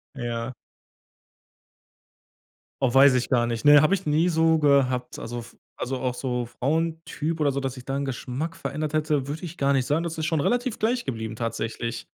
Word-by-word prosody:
Ja. 120 Hz, 0 st, -4 dB, 2.3 s
Oh, 125 Hz, -3 st, +2 dB
weiß 135 Hz, 0 st, +7 dB
ich 125 Hz, -, 0 dB
gar 120 Hz, -3 st, +3 dB
nicht. 115 Hz, -1 st, -3 dB
Ne 145 Hz, 0 st, +9 dB
habe 155 Hz, +6 st, +3 dB
ich 190 Hz, -, -7 dB
nie 155 Hz, +4 st, +2 dB
so 160 Hz, -1 st, +3 dB
gehabt. 130 Hz, -4 st, +2 dB
Also 120 Hz, +1 st, -5 dB
f 115 Hz, 0 st, -12 dB, 0.2 s
auch 130 Hz, -1 st, -2 dB
so 125 Hz, -2 st, -2 dB
Frauentyp 160 Hz, +4 st, -2 dB
oder 145 Hz, -2 st, +2 dB
so, 140 Hz, -, -2 dB
dass 135 Hz, -1 st, -2 dB
sich 125 Hz, -, -11 dB
da 135 Hz, 0 st, -2 dB
'n 140 Hz, -, -1 dB
Geschmack 135 Hz, +5 st, -4 dB
verändert 155 Hz, +1 st, -4 dB
hätte, 150 Hz, -3 st, 0 dB
würde 155 Hz, +4 st, -5 dB
ich 175 Hz, 0 st, -7 dB
gar 140 Hz, 0 st, +2 dB
nicht 130 Hz, -2 st, +1 dB
sagen. 155 Hz, +5 st, +1 dB
Das 165 Hz, -1 st, -4 dB
ist 160 Hz, -, -2 dB
schon 160 Hz, -4 st, +1 dB
relativ 245 Hz, -, 0 dB
gleich 240 Hz, +3 st, 0 dB
geblieben 110 Hz, -3 st, -4 dB
tatsächlich. 115 Hz, 0 st, -3 dB
140 Hz, 185 wpm, -25 LUFS, 125-160 Hz, 2.3 s, Ne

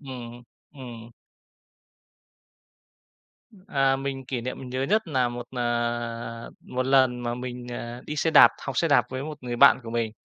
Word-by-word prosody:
Ừm, 120 Hz, -3 st, -9 dB, 0.3 s
ừm. 120 Hz, -4 st, -10 dB, 2.6 s
À, 135 Hz, -3 st, +2 dB
mình 135 Hz, -1 st, -4 dB
kỷ 125 Hz, -2 st, -3 dB
niệm 130 Hz, +2 st, -5 dB
mình 130 Hz, -, -8 dB
nhớ 130 Hz, +1 st, -2 dB
nhất 210 Hz, +10 st, +2 dB
nà 130 Hz, -5 st, +1 dB
một, 120 Hz, 0 st, -6 dB
à, 120 Hz, -1 st, -2 dB
một 130 Hz, 0 st, -3 dB
lần 130 Hz, -2 st, +3 dB
mà 120 Hz, 0 st, -2 dB
mình, 125 Hz, 0 st, -6 dB
à, 120 Hz, 0 st, -6 dB
đi 150 Hz, -, -5 dB
xe 160 Hz, +2 st, +1 dB
đạp -, -, +9 dB
học 140 Hz, -2 st, -4 dB
xe 165 Hz, -, +2 dB
đạp 135 Hz, -6 st, +4 dB
với 130 Hz, +1 st, -4 dB
một 150 Hz, 0 st, -6 dB
người 120 Hz, -1 st, -3 dB
bạn 140 Hz, +3 st, +7 dB
của 115 Hz, -, -7 dB
mình. 115 Hz, -1 st, -1 dB
125 Hz, 170 wpm, -26 LUFS, 120-135 Hz, 2.6 s, đạp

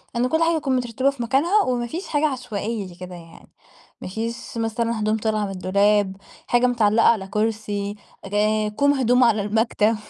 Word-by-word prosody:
إن 245 Hz, +1 st, +1 dB
كل 320 Hz, +3 st, +2 dB
حاجة 335 Hz, 0 st, +2 dB
نكون 275 Hz, -4 st, 0 dB
مترتبة 250 Hz, +2 st, 0 dB
في 275 Hz, -4 st, -4 dB
مكانها، 330 Hz, -, +2 dB
وما 240 Hz, -1 st, -1 dB
فيش 340 Hz, +10 st, -6 dB
حاجة 300 Hz, +1 st, +1 dB
عشوائية 225 Hz, -5 st, -4 dB
زي 175 Hz, -, -13 dB
كده 180 Hz, 0 st, -9 dB
يعني، 165 Hz, -1 st, -14 dB, 0.5 s
ما -, -, -6 dB
فيش 230 Hz, +4 st, -5 dB
مثلًا 230 Hz, 0 st, -1 dB
هدوم 215 Hz, +1 st, +1 dB
طالعة 215 Hz, -1 st, -1 dB
من 195 Hz, -, -5 dB
الدولاب، 195 Hz, +1 st, +1 dB, 0.3 s
حاجة 245 Hz, +1 st, +3 dB
متعلقة 225 Hz, -2 st, +3 dB
على 205 Hz, -5 st, +2 dB
كرسي، 210 Hz, -1 st, -2 dB, 0.3 s
ك 195 Hz, +1 st, -6 dB, 0.4 s
كوم 285 Hz, +3 st, +3 dB
هدوم 250 Hz, -1 st, +3 dB
على 225 Hz, -3 st, +3 dB
المكتب. 220 Hz, +1 st, +1 dB
225 Hz, 180 wpm, -22 LUFS, 205-250 Hz, 0.5 s, حاجة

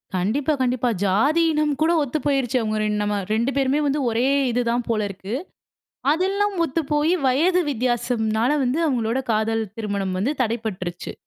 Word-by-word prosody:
கண்டிப்பா, 250 Hz, -, 0 dB
கண்டிப்பா. 250 Hz, -1 st, +1 dB
ஜாதி, 270 Hz, -, +3 dB
இனம் 300 Hz, -1 st, +1 dB
கூட 325 Hz, +2 st, +4 dB
ஒத்துப் 295 Hz, +3 st, -4 dB
போய்ருச்சு. 270 Hz, -3 st, +1 dB
அவங்க 215 Hz, -1 st, -1 dB
ரெண் 210 Hz, 0 st, 0 dB
நம 205 Hz, -1 st, -1 dB
2 235 Hz, +5 st, +1 dB
பேருமே 275 Hz, +2 st, +2 dB
வந்து 285 Hz, +2 st, 0 dB
ஒரே 235 Hz, +4 st, +1 dB, 0.2 s
இது 245 Hz, +1 st, +1 dB
தான் 240 Hz, 0 st, -1 dB
போலருக்கு. 205 Hz, -1 st, -2 dB, 0.8 s
அதெல்லாம் 395 Hz, +4 st, 0 dB
ஒத்துப்போய் 300 Hz, +2 st, 0 dB
வயது 350 Hz, +8 st, +3 dB
வித்தியாசம்னால 240 Hz, -2 st, 0 dB
வந்து 255 Hz, +5 st, 0 dB
அவங்களோட 240 Hz, -3 st, 0 dB
காதல் 225 Hz, +1 st, 0 dB
திருமணம் 200 Hz, -3 st, -2 dB
வந்து 250 Hz, +10 st, 0 dB
தடைப்பட்டுருச்சு. 215 Hz, -7 st, -4 dB
245 Hz, 145 wpm, -22 LUFS, 215-290 Hz, 0.8 s, கூட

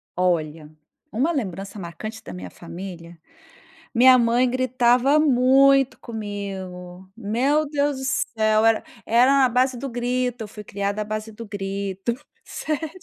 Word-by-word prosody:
Olha, 160 Hz, -4 st, -1 dB, 0.4 s
uma 265 Hz, +10 st, +1 dB
lembrança 200 Hz, -, -4 dB
marcante 215 Hz, +6 st, -7 dB
da -, -, -9 dB
minha 90 Hz, 0 st, -8 dB
família: 170 Hz, -, -10 dB, 0.7 s
Minha 255 Hz, +1 st, +7 dB
mãe 240 Hz, +1 st, +3 dB
gritava 255 Hz, +2 st, +3 dB
muito 270 Hz, -1 st, +4 dB
comigo. 190 Hz, -4 st, -7 dB
Meu 255 Hz, +8 st, +1 dB
Deus 285 Hz, -2 st, 0 dB
do 265 Hz, -, -6 dB
céu, 220 Hz, -4 st, +1 dB
era 225 Hz, -1 st, +3 dB, 0.2 s
era 240 Hz, +4 st, +4 dB
na 260 Hz, -2 st, +4 dB
base 255 Hz, +1 st, +1 dB
do 275 Hz, +2 st, -5 dB
grito. 245 Hz, 0 st, -2 dB
Eu -, -, -7 dB
fui 210 Hz, 0 st, -10 dB
criada 200 Hz, +1 st, -3 dB
à -, -, -3 dB
base 215 Hz, +1 st, -5 dB
do 230 Hz, +2 st, -9 dB
grito. 195 Hz, +1 st, -3 dB, 0.3 s
Sério. 310 Hz, +1 st, -4 dB
225 Hz, 140 wpm, -23 LUFS, 195-255 Hz, 0.7 s, Minha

